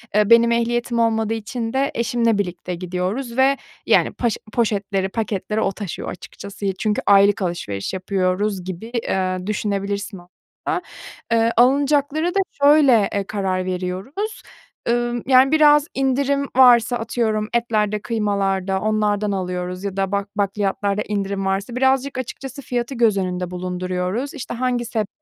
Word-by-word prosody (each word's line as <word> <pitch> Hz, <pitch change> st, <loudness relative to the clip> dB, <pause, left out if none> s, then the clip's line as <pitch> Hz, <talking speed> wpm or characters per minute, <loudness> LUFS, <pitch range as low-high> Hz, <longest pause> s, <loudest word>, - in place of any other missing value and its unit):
Eee, 210 Hz, 0 st, +3 dB
benim 235 Hz, 0 st, +6 dB
ehliyetim 235 Hz, 0 st, 0 dB
olmadığı 225 Hz, -1 st, +1 dB
için 225 Hz, +1 st, -4 dB
de 275 Hz, +1 st, +1 dB
eşimle 230 Hz, -2 st, +1 dB
birlikte 180 Hz, -2 st, -3 dB
gidiyoruz 185 Hz, +8 st, -3 dB
ve 270 Hz, +1 st, +4 dB, 0.3 s
yani -, -, +3 dB
paş 235 Hz, -3 st, -1 dB, 0.2 s
poşetleri, 200 Hz, -4 st, 0 dB
paketleri 215 Hz, 0 st, -2 dB
o 195 Hz, -, +1 dB
taşıyor 195 Hz, -4 st, -6 dB
açıkçası. 200 Hz, +3 st, -8 dB
Çünkü 210 Hz, -1 st, 0 dB
aylık 200 Hz, +1 st, +5 dB
alışveriş 170 Hz, -, -3 dB
yapıyoruz 190 Hz, +1 st, -1 dB
gibi, 185 Hz, +3 st, -6 dB, 0.2 s
eee, 185 Hz, 0 st, -1 dB
düşünebilirsin 200 Hz, -1 st, -2 dB
aslında. 175 Hz, +1 st, -6 dB, 0.5 s
Eee, 230 Hz, 0 st, +3 dB
alınacaklara 285 Hz, +5 st, +3 dB
da 395 Hz, -, +3 dB, 0.2 s
şöyle, 280 Hz, -8 st, +6 dB
eee, 200 Hz, -, 0 dB
karar 190 Hz, -3 st, -1 dB
veriyoruz. 185 Hz, -, -4 dB, 0.5 s
Iıı, 240 Hz, 0 st, 0 dB
yani 265 Hz, +1 st, +6 dB
biraz 300 Hz, -1 st, +5 dB
indirim 275 Hz, +1 st, +1 dB
varsa 245 Hz, -1 st, +6 dB
atıyorum 220 Hz, -2 st, -1 dB
etlerde, 215 Hz, -3 st, 0 dB
kıymalarda 195 Hz, -4 st, -1 dB
onlardan 210 Hz, -1 st, 0 dB
alıyoruz 180 Hz, 0 st, -3 dB
ya 195 Hz, -1 st, -4 dB
da 195 Hz, 0 st, 0 dB
bak 200 Hz, 0 st, -1 dB
bakliyatlarda 200 Hz, 0 st, 0 dB
indirim 200 Hz, -1 st, -2 dB
varsa 195 Hz, +5 st, -2 dB
birazcık 265 Hz, +1 st, +1 dB
açıkçası 265 Hz, +2 st, -6 dB
fiyatı 245 Hz, +1 st, -3 dB
göz 225 Hz, -4 st, +3 dB
önünde 180 Hz, -1 st, -2 dB
bulunduruyoruz. 180 Hz, +7 st, -3 dB
İşte 275 Hz, -, -6 dB
hangi 245 Hz, 0 st, -1 dB
sebzeler 220 Hz, -3 st, -2 dB
215 Hz, 135 wpm, -21 LUFS, 195-240 Hz, 0.5 s, benim